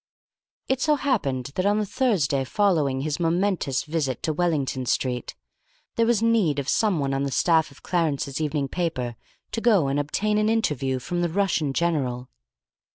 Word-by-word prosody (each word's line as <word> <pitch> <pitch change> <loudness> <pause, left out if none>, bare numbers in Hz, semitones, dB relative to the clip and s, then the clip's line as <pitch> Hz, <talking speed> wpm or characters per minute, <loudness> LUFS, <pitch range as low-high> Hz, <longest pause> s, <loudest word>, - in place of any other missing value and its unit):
It 265 0 0
so 300 0 +3
happened 140 - -1
that 185 - -1
on 205 +1 +3
the 215 - 0
Thursday 185 - +1
following 150 -6 +1
his 150 +2 -2
momentous 170 -5 0
visit 150 -6 -2
to 155 - 0
Wellington 145 -6 -1
Street, 125 -1 -1 0.6
there 230 0 +2
was 230 -2 +2
need 220 -11 +2
of 140 -2 -3
someone 155 -9 +1
on 135 - -1
the 140 - -1
staff 160 +2 +2
of 140 - -19
Clarence's 155 -5 -1
evening 150 -2 -1
paper 130 -8 -2 0.4
to 225 - -3
go 205 - +3
and 140 +1 0
obtain 210 +9 0
an 215 0 +2
interview 145 - 0
from 175 +7 -3
the 175 - +1
Russian 170 -5 0
general. 135 -6 -1
160 Hz, 165 wpm, -24 LUFS, 135-200 Hz, 0.6 s, so